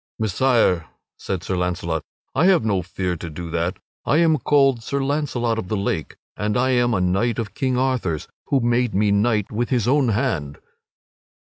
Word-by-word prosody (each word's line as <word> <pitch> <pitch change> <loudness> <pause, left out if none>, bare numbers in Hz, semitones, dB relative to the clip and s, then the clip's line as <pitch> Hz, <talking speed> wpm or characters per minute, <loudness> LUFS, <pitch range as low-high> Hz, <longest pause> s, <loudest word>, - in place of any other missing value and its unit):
"Messire," 110 -5 +2 0.3
said 95 -3 -4
Sir 95 - -2
Launcelot, 90 -3 -1 0.3
"I 140 +6 +2
have 185 -12 +4
no 100 -4 +1
fear 90 0 -3
to 85 - -7
do 85 +2 -7
that. 85 +2 -1 0.3
I 145 - +2
am 160 -3 +4
called 135 -1 +3
Sir 140 +5 -2
Launcelot 130 -5 -1
of 95 - -5
the 110 - -1
Lake, 100 -5 -2 0.2
and 105 +1 -1
I 130 +1 +2
am 120 -2 +2
a - - +1
knight 95 +6 +1
of 110 -3 -4
King 130 -3 -1
Arthur's, 125 - -1 0.2
who 135 -2 +2
made 120 -2 +1
me 105 +1 +3
knight 105 0 +1
with 120 +3 -1
his 120 -4 +1
own 140 0 +3
hand." 100 - -1
115 Hz, 180 wpm, -22 LUFS, 90-130 Hz, 0.3 s, have